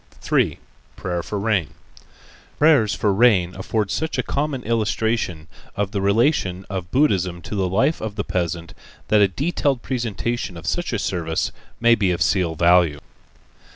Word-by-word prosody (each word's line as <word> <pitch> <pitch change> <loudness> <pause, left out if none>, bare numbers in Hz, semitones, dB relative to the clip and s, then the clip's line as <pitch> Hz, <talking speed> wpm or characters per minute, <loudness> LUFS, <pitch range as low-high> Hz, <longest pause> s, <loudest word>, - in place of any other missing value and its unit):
3. - - +1 0.4
Prayer 90 -1 -3
for 105 - -5
Rain 100 -7 0 0.8
Prayers 145 -9 +4
for 105 -2 +1
rain 95 -5 +4
afford 100 +2 -2
such 160 +7 -2
a - - 0
common 140 -3 -2
illustration 110 -7 -1 0.3
of 100 -1 -1
the 100 -3 -2
relation 100 - +1
of 90 -3 -4
Buddhism 95 - +1
to - - -7
the 95 -3 0
life 135 - +1
of 110 -2 -4
the 100 - -2
peasant 85 -2 -3 0.4
that 105 -1 +5
a 100 - +6
detailed 140 - -1
presentation 120 -5 -3
of 85 - -10
such 175 0 -1
a 115 - 0
service 85 -5 -2 0.3
may 120 0 +5
be 100 -5 +2
of 90 - +1
seal 90 -4 +1
value. 85 -2 +4
100 Hz, 155 wpm, -22 LUFS, 90-120 Hz, 0.8 s, a